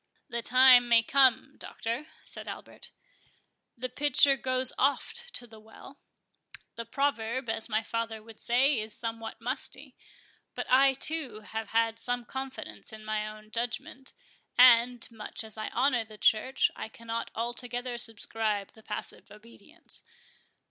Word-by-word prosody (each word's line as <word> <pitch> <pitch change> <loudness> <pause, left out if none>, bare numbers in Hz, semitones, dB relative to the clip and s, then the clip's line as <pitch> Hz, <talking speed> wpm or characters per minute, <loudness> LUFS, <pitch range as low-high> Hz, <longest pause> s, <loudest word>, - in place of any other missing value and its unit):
"The 235 - -3
time 250 0 +7
may 230 -1 +6
come, 260 -1 +3
Doctor," 235 +7 -4 0.2
said - - -7
Albert; - - -9 0.9
"The 255 +2 -3
pitcher 280 +1 +4
goes 255 0 +1
oft 450 - 0
to 245 - -2
the 220 -2 -14
well.—The 230 0 -14
proverb, 260 -2 -1
as 225 +1 -1
my 220 0 +1
father 225 -1 -3
would 225 -1 -13
say, 255 +2 +3
is 215 0 -3
somewhat 225 -1 -5
musty. 265 +2 -4 0.6
But - - -3
I, 270 +1 +6
too, 270 -6 -1
have 220 0 -6 0.3
some 245 0 -1
confidence 265 -1 -7
in 215 0 -11
my 215 0 -2
own 215 0 -11
judgment; 245 +4 -4 0.4
and, 245 -1 +6
much 220 0 -6
as 220 -1 -5
I 215 0 -4
honour 250 -1 +2
the 215 -1 -13
Church, 255 +6 +3
I - - -6
cannot 230 +1 -5
altogether 240 +1 -3
subscribe 220 -3 0
to 220 - -17
passive 210 -1 -6
obedience. 230 - -11
235 Hz, 135 wpm, -29 LUFS, 220-260 Hz, 0.9 s, time